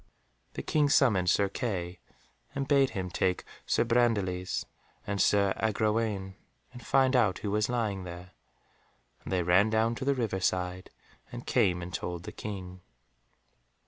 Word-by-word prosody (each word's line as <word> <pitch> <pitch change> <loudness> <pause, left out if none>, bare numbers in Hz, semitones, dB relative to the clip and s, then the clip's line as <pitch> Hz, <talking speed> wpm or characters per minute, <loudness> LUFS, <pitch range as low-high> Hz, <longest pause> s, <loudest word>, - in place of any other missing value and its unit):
The - - -5
King 150 -2 +2
summoned 105 -11 +4
Sir 100 +2 +3
Kay, 95 -5 -4 0.6
and 135 -1 -2
bade 135 -2 +4
him 90 -1 -3
take 90 +1 0 0.2
Sir - - +3
Brandiles 105 -7 0 0.4
and 100 -1 -1
Sir 100 -1 +3
Agrawaine, 105 -2 0 0.4
and 125 -1 -11
find 135 +1 +3
out 105 -7 +3
who 100 - -1
was 105 +1 +1
lying 110 -6 -1
there, 90 +1 -9 0.9
and - - -7
they 90 -2 +1
ran 90 +5 +4
down 110 +1 +2
to 125 - -5
the 140 0 +2
river 110 -7 -1
side, 90 0 -1 0.4
and - - -8
came 90 -1 +2
and 90 +1 -8
told 85 -1 -4
the - - -7
King. 95 -3 -7
100 Hz, 150 wpm, -29 LUFS, 90-115 Hz, 0.9 s, summoned